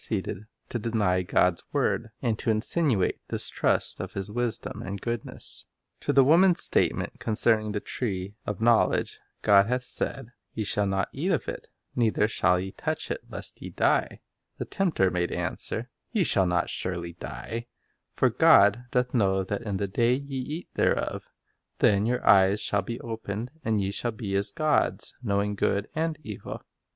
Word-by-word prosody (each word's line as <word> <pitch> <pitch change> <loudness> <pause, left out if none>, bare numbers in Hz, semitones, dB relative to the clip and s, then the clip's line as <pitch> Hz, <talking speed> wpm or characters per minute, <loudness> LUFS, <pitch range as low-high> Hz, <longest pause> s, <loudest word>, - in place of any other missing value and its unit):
ceeded 105 0 -3 0.2
to 120 - -3
deny 105 -5 +1
God 90 -1 +2
s - - -14
word, 115 - 0
and 115 -3 +1
to - - -2
insinuate 110 - +2
distrust - - 0
of - - -5
His 100 +1 -5
wisdom 120 0 -2
and 100 +1 -5
goodness. 120 +1 -5 0.3
To - - -1
the 135 - +6
woman's 175 +6 +5
statement - - +1
concerning 110 -1 +2
the 105 -1 -2
tree 100 -5 -3
of 105 -2 -4
knowledge, 115 0 +2 0.2
"God 100 -1 +6
hath 125 +1 0
said, 125 0 -2 0.2
Ye 110 - -1
shall 105 0 0
not 95 0 0
eat 160 +8 -2
of 165 - 0
it, - - -6 0.3
neither 110 -3 +2
shall 90 -4 +2
ye 95 +1 -4
touch - - -3
it, - - -3
lest - - -6
ye - - -6
die," - - +1 0.4
the - - -4
tempter 160 - +1
made 90 -1 -1
answer, 120 +3 -3
" - - -52
Ye 215 -6 +2
shall 95 - +3
not 90 0 +1
surely 85 -2 -3
die; 70 - -6 0.4
for - - +2
God 105 +5 +5
doth 125 0 0
know 95 -5 +2
that 100 +1 -3
in 105 -4 -3
the 100 - -1
day 120 +6 +2
ye 140 0 -5
eat 150 +6 -5
thereof, - - 0 0.5
then 100 +1 +3
your 125 +1 -1
eyes 100 +1 +6
shall 105 -1 +1
be 115 +5 -5
opened, 115 0 -5
and 110 -2 +1
ye 95 - -1
shall 120 - -2
be 105 -3 -5
as 100 +1 +2
gods, 155 +9 0
knowing 100 -3 0
good 100 0 0
and 160 0 -1
evil." 105 -3 -7
110 Hz, 175 wpm, -27 LUFS, 95-120 Hz, 0.5 s, the